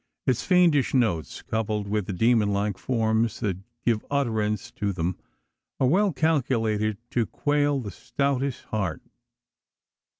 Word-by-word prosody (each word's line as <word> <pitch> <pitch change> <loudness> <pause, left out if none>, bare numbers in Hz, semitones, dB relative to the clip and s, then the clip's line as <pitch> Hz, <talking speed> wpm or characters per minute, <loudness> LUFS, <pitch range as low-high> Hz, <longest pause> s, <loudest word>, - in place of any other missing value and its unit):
Its 125 -2 +2
fiendish 170 -8 +3
notes, 100 - 0
coupled 110 -2 -2
with 105 -1 -1
the - - -2
demon 110 +1 +3
like 100 -1 -1
forms 115 -2 0
that 100 -6 -1 0.3
give 115 -3 +2
utterance, 110 -7 0
to 100 -1 -2
them, 90 -1 -2 0.6
are - - +3
well 190 +9 +3
calculated 115 -9 +1
to 115 -3 +1
quail 145 -1 +1
the 105 -6 -5
stoutest 140 +5 -2
heart. 100 -9 -3
110 Hz, 130 wpm, -26 LUFS, 105-135 Hz, 0.6 s, fiendish